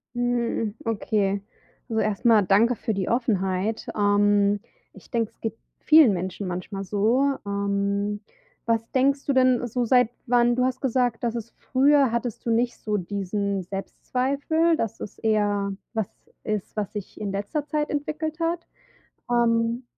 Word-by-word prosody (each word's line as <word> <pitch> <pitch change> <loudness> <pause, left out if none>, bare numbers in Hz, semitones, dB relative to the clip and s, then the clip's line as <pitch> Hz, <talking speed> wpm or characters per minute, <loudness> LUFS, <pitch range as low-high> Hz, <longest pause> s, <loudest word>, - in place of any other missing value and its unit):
Hm, 240 -3 -1
okay. 205 -3 0 0.5
Also, 220 -1 +1
erst 215 +2 -2
mal 225 -3 +6
danke 215 +6 +4
für 220 +1 -2
die 195 -2 -2
Offenheit, 210 -3 0
ähm, 205 0 +3 0.3
ich - - -16
denke, 230 -3 0
es - - -38
geht 225 0 -3 0.2
vielen 310 -6 +7
Menschen 185 +2 -4
manchmal 185 +2 -4
so. 225 +8 +2
Ähm, 200 0 -1 0.5
was 230 0 0
denkst 275 +2 +2
du - - +1
denn, 255 -2 +3
so 245 +1 -1
seit 245 0 +4 0.2
wann 240 -1 +3
du 250 +1 +2
hast 255 -1 -2
gesagt, 245 -3 0
dass 235 -1 -1
es 230 0 -6
früher 275 -1 +3
hattest 235 -1 -3
du - - -1
nicht 240 +2 +1
so 210 -1 -2
diesen 200 +1 -2
Selbstzweifel, 275 - 0
dass 225 -9 -3
es - - -8
eher 205 -2 +1 0.2
was 220 -4 -1 0.3
ist, 215 -2 -3
was 210 -2 -2
sich 205 -3 -7
in 200 -2 -2
letzter 205 +9 -3
Zeit 300 -1 -1
entwickelt 310 +2 -3
hat? 335 +1 -1 0.6
Ähm, 235 0 +2
225 Hz, 155 wpm, -25 LUFS, 200-250 Hz, 0.6 s, vielen